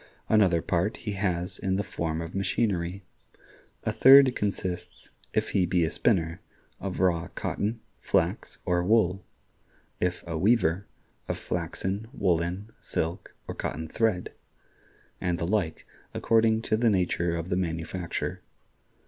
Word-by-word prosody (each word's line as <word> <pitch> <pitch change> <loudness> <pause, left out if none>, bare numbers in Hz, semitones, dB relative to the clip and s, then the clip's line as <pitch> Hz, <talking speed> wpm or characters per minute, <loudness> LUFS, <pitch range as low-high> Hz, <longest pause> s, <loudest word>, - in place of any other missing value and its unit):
Another 95 -7 +4
part 90 +5 0
he 105 - -5
has 90 -3 -2
in 95 -1 0
the 100 - 0
form 80 -3 -3
of 85 +1 -6
machinery. 95 -2 -1 0.8
A - - 0
third 135 -1 +8
consists, 95 -3 -4 0.2
if - - 0
he 90 -2 +2
be 90 -1 +2
a 80 - -2
spinner, 85 -7 +1 0.4
of 95 -1 -4
raw 85 -3 +2
cotton, 110 +3 -2 0.2
flax, - - 0
or 90 0 +2
wool; 95 -2 +3 0.8
if 90 0 -1
a 80 -2 -3
weaver, 100 -2 +2 0.4
of - - -2
flaxen, 95 +5 -3
woolen, 90 +1 0
silk, 85 +4 -3
or - - -4
cotton 80 +1 -4
thread; 110 0 0 0.9
and 90 -2 0
the 85 - -2
like, 90 -4 -1 0.3
according 110 0 +3
to 110 - +1
the 115 0 +3
nature 90 -3 +1
of 85 +2 -5
the 90 - +1
manufacture. 85 0 -3
90 Hz, 135 wpm, -27 LUFS, 85-105 Hz, 0.9 s, third